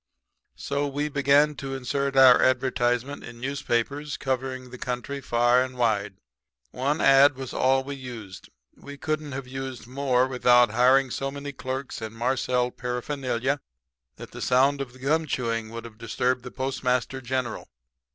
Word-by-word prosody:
"So, 140 Hz, +1 st, -2 dB
we 145 Hz, +2 st, -2 dB
began 140 Hz, +1 st, +3 dB
to 135 Hz, -1 st, -5 dB
insert 135 Hz, +1 st, -2 dB
our 130 Hz, -2 st, +8 dB
advertisement 130 Hz, +1 st, +1 dB
in 115 Hz, 0 st, -10 dB
newspapers 140 Hz, +2 st, -2 dB
covering 130 Hz, -1 st, -3 dB
the 125 Hz, -, -9 dB
country 125 Hz, +3 st, -4 dB
far 120 Hz, 0 st, +3 dB
and 130 Hz, -1 st, -7 dB
wide. 105 Hz, -5 st, 0 dB, 0.6 s
One 140 Hz, +5 st, -1 dB
ad 135 Hz, +1 st, +6 dB
was 135 Hz, -1 st, -7 dB
all 135 Hz, +1 st, +2 dB
we 140 Hz, +1 st, -6 dB
used. 115 Hz, -7 st, -9 dB, 0.3 s
We 140 Hz, 0 st, -11 dB
couldn't 155 Hz, -1 st, -3 dB
have 135 Hz, 0 st, -5 dB
used 130 Hz, -2 st, -6 dB
more 130 Hz, 0 st, +1 dB
without 125 Hz, -2 st, +4 dB
hiring 130 Hz, +3 st, +4 dB
so 135 Hz, -, -2 dB
many 140 Hz, +1 st, -6 dB
clerks 130 Hz, 0 st, -5 dB
and 110 Hz, 0 st, -6 dB
marcelled 125 Hz, +1 st, 0 dB
paraphernalia 125 Hz, +1 st, -2 dB, 0.5 s
that -, -, -11 dB
the -, -, -9 dB
sound 135 Hz, +3 st, +3 dB
of 125 Hz, -3 st, -6 dB
the -, -, -15 dB
gum 155 Hz, +5 st, 0 dB
chewing 115 Hz, -4 st, -2 dB
would 115 Hz, +1 st, -7 dB
have 110 Hz, -2 st, -12 dB
disturbed 125 Hz, +3 st, -1 dB
the 125 Hz, -, -8 dB
Postmaster 130 Hz, 0 st, -2 dB
General. 130 Hz, -1 st, -3 dB
130 Hz, 155 wpm, -26 LUFS, 125-140 Hz, 0.6 s, our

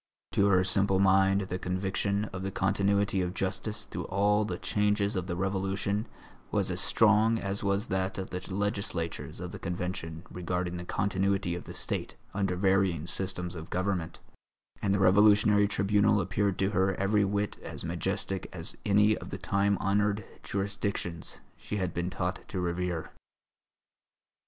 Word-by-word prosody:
To 100 Hz, -, +3 dB
her 95 Hz, -2 st, +4 dB
simple 95 Hz, +1 st, +2 dB
mind 95 Hz, +1 st, +4 dB
the 95 Hz, -1 st, -3 dB
conviction 95 Hz, +3 st, -1 dB
of 95 Hz, -, -4 dB
the 95 Hz, -, -2 dB
continuity 100 Hz, 0 st, +1 dB
of 90 Hz, 0 st, -2 dB
justice 105 Hz, +2 st, -2 dB
through -, -, -5 dB
all 105 Hz, +2 st, +2 dB
the -, -, -3 dB
changes 105 Hz, 0 st, +1 dB
of 90 Hz, -1 st, -2 dB
the 85 Hz, -, -2 dB
Revolution 95 Hz, +3 st, -1 dB, 0.4 s
was -, -, +1 dB
as -, -, +1 dB
strong 110 Hz, +1 st, +4 dB
as 100 Hz, -1 st, -3 dB
was 100 Hz, +2 st, +1 dB
that 95 Hz, 0 st, -1 dB
of 95 Hz, -1 st, -5 dB
the 90 Hz, 0 st, -4 dB
legislators 100 Hz, -4 st, -2 dB
of -, -, -5 dB
the -, -, -7 dB
Convention 85 Hz, -2 st, -4 dB
regarding 90 Hz, 0 st, -2 dB
the 85 Hz, -, -6 dB
continuity 100 Hz, -1 st, 0 dB
of 90 Hz, -, -6 dB
the -, -, -8 dB
State -, -, -3 dB, 0.2 s
under 95 Hz, -2 st, 0 dB
varying 95 Hz, -4 st, +2 dB
systems 90 Hz, -1 st, -3 dB
of 85 Hz, 0 st, -8 dB
government, 90 Hz, -3 st, -1 dB, 0.6 s
and 100 Hz, -, +1 dB
the 100 Hz, -, +3 dB
Revolutionary 105 Hz, +2 st, +5 dB
Tribunal 105 Hz, +1 st, +3 dB
appeared 100 Hz, +1 st, 0 dB
to 95 Hz, +1 st, +1 dB
her 95 Hz, -2 st, +2 dB
every 105 Hz, +2 st, +2 dB
whit 100 Hz, +1 st, -1 dB
as -, -, -3 dB
majestic 95 Hz, -1 st, -2 dB
as 80 Hz, -2 st, -2 dB
any 105 Hz, +1 st, +4 dB
of -, -, -8 dB
the -, -, -4 dB
time 100 Hz, 0 st, +1 dB
honoured 100 Hz, +1 st, +1 dB, 0.2 s
jurisdictions 100 Hz, -4 st, -3 dB
she 105 Hz, -, -5 dB
had 90 Hz, -3 st, -1 dB
been 85 Hz, +1 st, -1 dB
taught 90 Hz, 0 st, -2 dB
to 95 Hz, -, -4 dB
revere. 90 Hz, -1 st, -2 dB
95 Hz, 160 wpm, -29 LUFS, 90-100 Hz, 0.6 s, Revolutionary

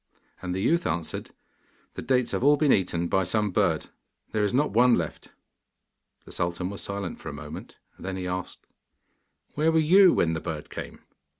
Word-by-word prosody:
And 90 Hz, -1 st, -3 dB
the 95 Hz, -, -2 dB
youth 170 Hz, +7 st, +2 dB
answered, 85 Hz, -2 st, -3 dB, 0.6 s
'The -, -, -6 dB
dates 125 Hz, -2 st, +1 dB
have -, -, -2 dB
all 145 Hz, +1 st, +5 dB
been 145 Hz, -1 st, +3 dB
eaten 85 Hz, -2 st, +1 dB
by 95 Hz, +2 st, +2 dB
some 105 Hz, +3 st, 0 dB
bird: -, -, 0 dB, 0.4 s
there 110 Hz, -, 0 dB
is 100 Hz, -, +1 dB
not 145 Hz, +4 st, +1 dB
one 120 Hz, +3 st, +5 dB
left.' 80 Hz, -3 st, -4 dB, 1.0 s
The -, -, -13 dB
sultan 90 Hz, +2 st, -2 dB
was 100 Hz, -, -7 dB
silent 100 Hz, -3 st, -5 dB
for -, -, -7 dB
a -, -, -7 dB
moment: 75 Hz, +1 st, -9 dB, 0.2 s
then 95 Hz, 0 st, -5 dB
he 90 Hz, -, -4 dB
asked, 90 Hz, 0 st, -5 dB, 0.9 s
'Where 155 Hz, +2 st, +2 dB
were 160 Hz, -, +2 dB, 0.2 s
you 195 Hz, -3 st, +8 dB
when 80 Hz, -1 st, +1 dB
the 80 Hz, -, -3 dB
bird 80 Hz, -3 st, -6 dB
came? -, -, -8 dB
95 Hz, 185 wpm, -26 LUFS, 85-125 Hz, 1.0 s, you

